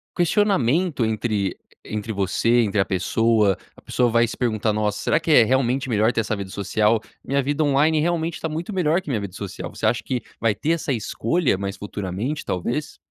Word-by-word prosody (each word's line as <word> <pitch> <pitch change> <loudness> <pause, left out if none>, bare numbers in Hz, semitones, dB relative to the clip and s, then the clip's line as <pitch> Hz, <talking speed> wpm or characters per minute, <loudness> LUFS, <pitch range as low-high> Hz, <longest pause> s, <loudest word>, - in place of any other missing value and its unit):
questionamento 175 - +2
entre 105 -3 -1 0.3
entre 110 +1 -4
você, 105 +5 +2
entre 105 -2 0
a 95 - +3
pessoa. 105 +1 +2 0.2
A - - -17
pessoa 125 -1 +1
vai 115 +1 +4
se 115 - -7
perguntar: 110 -3 0
"Nossa, 105 -1 -1
será 155 - +2
que 160 0 -1
é 120 - +8
realmente 130 +2 +1
melhor 110 +1 +2
ter - - +1
essa 110 0 -2
vida 100 -2 -6
social? 105 +3 +1 0.2
Minha 140 0 +1
vida 145 +3 -1
online 150 +3 +3
realmente 165 0 0
está - - -3
muito 160 +5 -4
melhor 175 -1 +2
que 185 - -9
minha 120 -6 0
vida 100 -3 -6
social". 95 -4 -6
Você - - -3
acha 115 +2 +2
que 125 -2 -2 0.2
vai 110 -2 +1
ter 155 - -1
essa 160 -4 0
escolha 115 - 0
mais 100 +1 -4
futuramente, 105 +8 -4
talvez? 120 - -3
115 Hz, 195 wpm, -23 LUFS, 105-150 Hz, 0.3 s, é